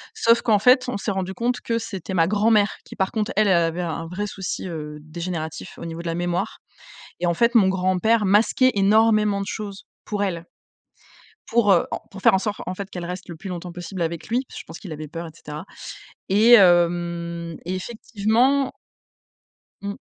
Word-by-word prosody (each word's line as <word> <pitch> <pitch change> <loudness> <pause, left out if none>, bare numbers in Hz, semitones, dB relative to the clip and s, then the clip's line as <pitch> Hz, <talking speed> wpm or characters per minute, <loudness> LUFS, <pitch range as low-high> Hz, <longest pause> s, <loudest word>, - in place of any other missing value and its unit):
Sauf 230 +1 +4
qu'en 215 -3 +3
fait, 250 +3 +5
on 250 - -2
s'est 200 +1 -2
rendus 190 -1 -3
compte 240 +5 -1
que 230 - -1
c'était 195 -5 -6
ma 165 -3 +3
grand-mère 210 +1 +3
qui, - - -11
par 190 0 0
contre, 220 +2 -1
elle, 215 - +4
elle 190 - +5
avait 170 +1 +1
un 165 -1 -4
vrai 185 +5 -3
souci, 190 -1 -5
heu, 150 -3 -6
dégénératif 160 0 -6
au - - -8
niveau 165 0 -6
de 170 - -6
la 165 - -1
mémoire 175 0 -2 0.6
et 175 - 0
en 170 - +2
fait, 235 +5 +2
mon 200 -5 +6
grand-père 190 +4 +2
masquait 225 +6 +4
énormément 210 0 +3
de 195 - -4
choses 200 -2 -6 0.2
pour 205 -1 -2
elle. 170 -4 -3 1.0
Pour, 225 -4 +3
heu, 175 - +3
en - - -2
pour 195 - -10
faire - - +6
en - - +4
sorte 205 +1 -3
en 185 - -3
fait 195 +1 -6
qu'elle 175 -1 -6
reste 180 +2 -6
le 170 - -6
plus 190 +5 -8
longtemps 180 -1 -6
possible 175 +1 -5
avec 165 0 -3
lui. 245 +4 0
Je - - -6
pense - - -9
qu'il 185 -6 -9
avait 155 0 -7
peur 165 +2 -6
et 160 - -9
cetera. 150 0 -8 0.6
Et 215 +5 +5
hem 170 -3 +3
et 180 +2 -3
effectivement 235 +6 +1 1.1
Mmh. 200 0 -4
190 Hz, 200 wpm, -23 LUFS, 170-215 Hz, 1.1 s, mon